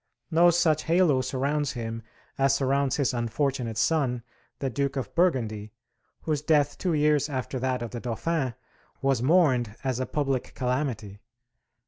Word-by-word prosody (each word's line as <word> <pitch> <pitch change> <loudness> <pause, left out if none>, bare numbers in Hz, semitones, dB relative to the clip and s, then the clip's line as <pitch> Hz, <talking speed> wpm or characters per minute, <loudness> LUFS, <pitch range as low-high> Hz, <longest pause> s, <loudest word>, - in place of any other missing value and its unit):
No 170 +2 +6
such 165 -3 +2
halo 165 -5 +3
surrounds 140 +3 -1
him 115 -1 -5 0.3
as 135 0 +3
surrounds 135 0 +1
his 140 -2 +1
unfortunate 120 0 -1
son, 125 -2 +1 0.3
the 135 - -2
Duke 140 +4 -1
of 130 -6 -4
Burgundy, 115 - 0 0.5
whose 150 -3 -1
death 145 -2 +2
two 180 -3 0
years 150 -1 +2
after 130 -1 -3
that 130 -1 -1
of 115 - -6
the 120 - -5
Dauphin 130 +2 -2 0.5
was 135 -3 +2
mourned 130 - +3
as 130 -2 -1
a 130 - -2
public 135 -4 -2
calamity. 125 -6 -2
135 Hz, 145 wpm, -27 LUFS, 120-150 Hz, 0.5 s, No